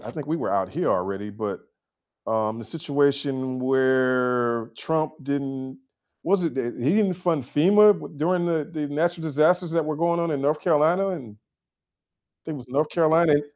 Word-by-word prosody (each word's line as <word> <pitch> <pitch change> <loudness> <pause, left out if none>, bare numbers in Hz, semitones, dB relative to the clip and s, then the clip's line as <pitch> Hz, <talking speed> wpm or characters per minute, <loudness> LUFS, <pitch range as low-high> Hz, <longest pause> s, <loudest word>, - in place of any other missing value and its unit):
I - - -8
think 150 -3 -7
we 160 +2 -1
were - - -2
out 95 -2 0
here - - -2
already, 100 +3 -2
but, 105 0 -5 0.7
um, 110 0 -1
the - - -7
situation 140 -3 -1
where 125 -3 +1
Trump 155 -1 -1
didn't 135 -1 -4 0.4
was 185 +1 +2
it 165 - -2
that 120 -3 -3
he 140 +8 +2
didn't 205 -4 +2
fund 170 -5 -1
FEMA? 205 +11 +5
W - - -9
during 175 +3 +1
the 160 -3 0
the 150 -3 -3
natural 165 +4 -1
disasters 160 +4 +2
that 165 -2 0
were 155 -1 -2
going 170 +2 +1
on 170 -1 -1
in 140 - -2
North 150 +2 +1
Carolina? 170 +4 +2
And 120 - -7 1.1
think 155 -2 -5
it - - -7
was 125 -1 -13
North 145 +4 0
Carolina 165 -1 +3
and 145 0 +3
145 Hz, 180 wpm, -24 LUFS, 130-165 Hz, 1.1 s, FEMA